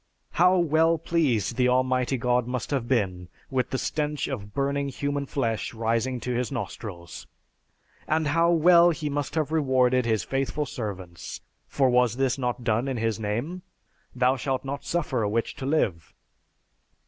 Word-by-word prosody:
How 180 +2 +4
well 165 0 +3
pleased 140 - 0
the 125 -1 +3
Almighty 130 +1 +1
God 125 0 +1
must 125 +1 -3
have 130 -5 -1
been 95 -8 -1 0.2
with 130 -2 0
the 130 - -1
stench 150 +1 -2
of 105 -7 -5
burning 140 +2 -1
human 140 +1 -3
flesh 120 -1 -2
rising 115 +3 0
to 125 - -2
his 125 +2 -1
nostrils. 100 - -6 0.8
And 155 -1 +1
how 165 +3 +3
well 170 +1 +6
he 155 -3 -2
must 145 0 -3
have 155 -2 0
rewarded 130 -5 +2
his 110 -5 +1
faithful 135 +2 -1
servants, 95 - -6 0.3
for 135 - +2
was 125 -2 +3
this 130 0 0
not 125 -1 -2
done 115 +2 +1
in 130 -2 -2
His 115 0 -1
name? 120 - -3 0.5
"Thou 130 +1 +2
shalt 135 0 -2
not 140 +1 -4
suffer 150 -8 -1
a 105 - 0
witch 115 +2 -1
to 135 -2 -4
live." 95 - -1
130 Hz, 160 wpm, -26 LUFS, 115-145 Hz, 0.8 s, well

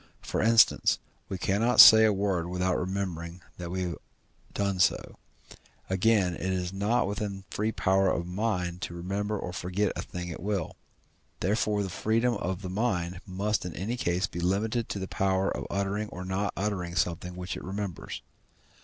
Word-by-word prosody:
For - - -1
instance, 115 0 +5 0.3
we 95 - -3
cannot 110 +7 +1
say 110 0 +11
a 110 - +4
word 95 -4 0
without 90 0 0
remembering 90 -2 -3 0.2
that 85 -1 -5
we 90 +1 -2
have 85 -1 -3 0.5
done 100 -2 -1
so. 90 - +1 0.7
Again, 95 -1 +3
it - - -8
is 90 0 -2
not 105 +5 +1
within 100 0 -3
the 95 - -12
free 110 +2 0
power 95 -2 +2
of 85 - -1
the 90 - -8
mind 90 -4 -1
to 85 - -5
remember 100 +4 -2
or 90 - -5
forget 95 +3 -1
a - - -3
thing 90 -1 -6
at 80 - -7
will. 100 -3 -2 0.6
Therefore 105 +2 +1
the 95 - -4
freedom 115 +5 +1
of 95 -2 -3
the 90 - -4
mind 90 -5 -1
must 100 +3 -1
in 90 - -6
any 105 +7 -2
case 90 -6 0
be 85 - -6
limited 110 +6 0
to - - -3
the 95 -1 -4
power 95 0 0
of - - -5
uttering 100 +2 -1
or 90 +1 -7
not 95 +2 -1
uttering 95 -4 -2
something 90 0 -1
which 90 0 -5
it - - -7
remembers. 95 -3 -5
95 Hz, 180 wpm, -28 LUFS, 90-105 Hz, 0.7 s, say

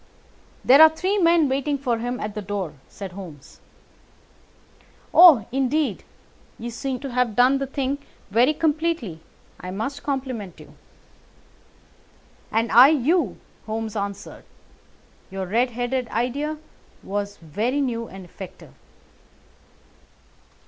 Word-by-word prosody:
"There 275 +4 +7
are 315 - +10
three 370 +6 -1
men 335 -3 +4
waiting 275 +2 -1
for 245 -4 -1
him 245 +2 -3
at 210 0 -4
the 210 - -5
door," 195 -4 -4 0.2
said 195 -2 -8
Holmes. 175 -7 -11 1.5
"Oh, 320 - +8
indeed! 270 +3 0 0.5
You 235 +1 -6
seem 255 +2 -4
to 275 -2 -5
have 245 -3 0
done 255 +2 +4
the 275 - -3
thing 275 +1 -2 0.3
very 245 +8 +3
completely. 310 - -1 0.4
I 180 - -7
must 220 +9 -4
compliment 255 - -4
you." - - -14 1.8
"And 230 +1 0
I 245 +3 +9
you," 300 - +1 0.3
Holmes 220 0 -4
answered. 200 -1 -6 0.8
"Your 190 0 -4
red 235 +7 +1
headed 245 +1 -2
idea 280 +8 -2 0.5
was 205 0 -4
very 215 - -2
new 230 -4 -2
and 190 -1 -11
effective." 185 +1 -12
245 Hz, 120 wpm, -23 LUFS, 205-280 Hz, 1.8 s, are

